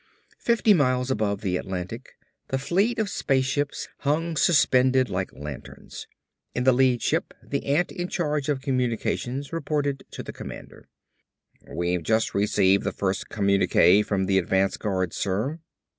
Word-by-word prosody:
Fifty 230 -2 +3
miles 130 -5 +1
above 105 -4 -1
the 90 -3 0
Atlantic 95 +7 -6 0.3
the 135 - -1
fleet 195 - +1
of 220 -2 0
spaceships 140 -3 -1
hung 160 +3 0
suspended 130 -5 +3
like 95 0 -2
lanterns. 75 0 -9 0.5
In 125 - 0
the 130 0 +5
lead 125 -1 +2
ship - - -1
the - - -4
ant 150 +6 +1
in 175 -1 -4
charge 150 -5 -1
of 140 -3 0
communications 130 +1 -2
reported 145 -3 -1
to - - -7
the - - -8
commander. - - -10 0.8
"We've 85 0 -1
just 110 +7 +1
received 100 -1 +3
the - - -1
first 95 -1 -2
communique 100 -1 +4
from 100 -2 -1
the 95 0 +3
advance 95 +1 +1
guard, 95 -4 -2
sir." 110 - -2
125 Hz, 145 wpm, -25 LUFS, 100-145 Hz, 0.8 s, the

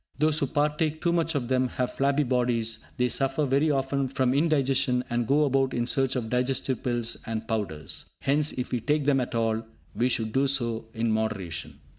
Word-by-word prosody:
Those 155 +1 +3
who 140 - 0
partake 150 +2 0
too 170 - +1
much 165 -1 0
of 130 -4 -1
them 130 0 +2
have 125 0 -2
flabby 140 +2 +2
bodies; 120 -3 0
they 125 -1 +2
suffer 135 +3 0
very 140 +3 +2
often 135 -1 0
from 130 -1 +1
indigestion, 135 -4 +2
and 120 -1 0
go 150 +3 +4
about 135 -1 +1
in 120 -1 0
search 135 +2 +1
of 120 -3 -2
digestive 125 +2 -1
pills 120 -2 -1
and 110 0 -3
powders. 105 -10 -3 0.2
Hence, 145 +2 +2
if 125 - -4
we 125 - 0
take 150 +4 0
them 140 -2 +3
at 125 0 -4
all, 115 -1 0 0.3
we 125 +2 +2
should 110 -3 -1
do 135 +1 +3
so 120 -4 0
in 115 0 0
moderation. 105 -6 -3
130 Hz, 195 wpm, -27 LUFS, 120-140 Hz, 0.3 s, go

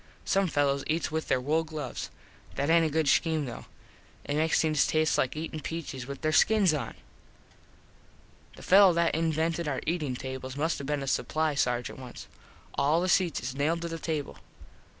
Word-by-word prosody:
Some 195 0 +2
fellos 140 -3 +1
eats 160 0 -1
with 160 0 -2
there - - +2
wool 155 +5 +1
gloves. 155 -5 -6 0.5
That 140 +3 0
aint 165 0 +5
a - - -2
good 155 0 0
scheme 160 -1 +2
though. 120 - -8 0.6
It 145 - -2
makes 160 +1 +2
things 155 -2 +2
taste 155 0 +2
like 130 - 0
eatin 155 0 -5
peaches 145 -5 -6
with 140 0 -7
there 155 - +1
skins 195 +3 +4
on. 150 - -4 1.6
The - - -13
fello 195 -1 +7
that 170 0 +2
invented 165 +1 0
our 135 -3 -1
eatin 155 -6 -1
tables 130 +1 -6
must 160 +3 0
have 140 - -6
been 145 -2 -1
a - - -6
supply 155 +3 0
Sargent 125 -2 -1
once. 125 -2 -10 0.5
All 150 +4 +2
the 180 - 0
seats 175 -2 +2
is 125 +1 -3
nailed 155 +5 0
to - - -2
the 165 0 -5
table. 155 -4 -4
155 Hz, 185 wpm, -28 LUFS, 140-165 Hz, 1.6 s, fello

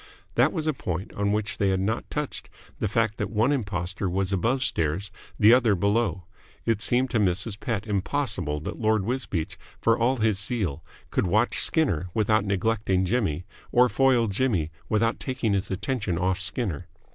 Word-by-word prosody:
That - - +4
was 160 -4 -3
a 155 - +1
point 90 -7 -4
on 100 0 0
which 105 +1 -2
they 100 - +3
had 95 -1 +1
not 110 +5 -2
touched, 150 -1 -4 0.3
the - - 0
fact 110 0 0
that 105 - -2
one 110 +5 +2
impostor 95 -7 -2
was 95 +2 -1
above 120 +8 +1
stairs, 85 - -1 0.3
the 110 +3 +7
other 120 -5 +4
below. 100 -1 +1 0.4
It 115 -2 +1
seemed 125 +2 +1
to 115 - +2
Mrs. 100 +2 0
Pett 115 -5 -2
impossible 105 - -1
that - - -6
Lord 110 -2 +2
Wisbeach, 115 -9 -2 0.2
for 115 - +3
all 120 +3 +1
his 110 -4 +1
zeal, 100 - -1 0.3
could - - +1
watch 110 +7 +2
Skinner 95 - +1
without 110 -1 +2
neglecting 100 -1 +1
Jimmy 90 -6 0 0.3
or 125 +1 +5
foil 125 +2 +3
Jimmy 100 -7 0 0.2
without 115 +2 +1
taking 130 -5 -1
his 100 0 -1
attention 105 -2 -2
off 90 +1 0
Skinner. 95 - -2
105 Hz, 170 wpm, -26 LUFS, 95-120 Hz, 0.4 s, the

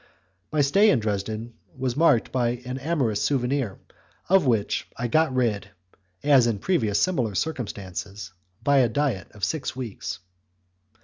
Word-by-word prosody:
My 155 -1 +2
stay 195 +10 +5
in 135 - +4
Dresden 110 +2 -3 0.2
was 130 -2 -1
marked 145 -6 +3
by 120 -1 0
an 125 +1 -4
amorous 135 -8 0
souvenir 130 -5 0 0.5
of 190 -6 +4
which 110 -4 0
I 120 - -1
got 155 +4 +2
rid, 120 -5 0 0.5
as 135 -5 +5
in 115 -3 0
previous 110 - +1
similar 125 - 0
circumstances, 100 - -4 0.3
by 140 +2 +4
a 125 -3 +4
diet 120 - -1
of 105 - -13
six 150 -5 -1
weeks. 95 -8 -5
125 Hz, 140 wpm, -25 LUFS, 105-145 Hz, 0.5 s, stay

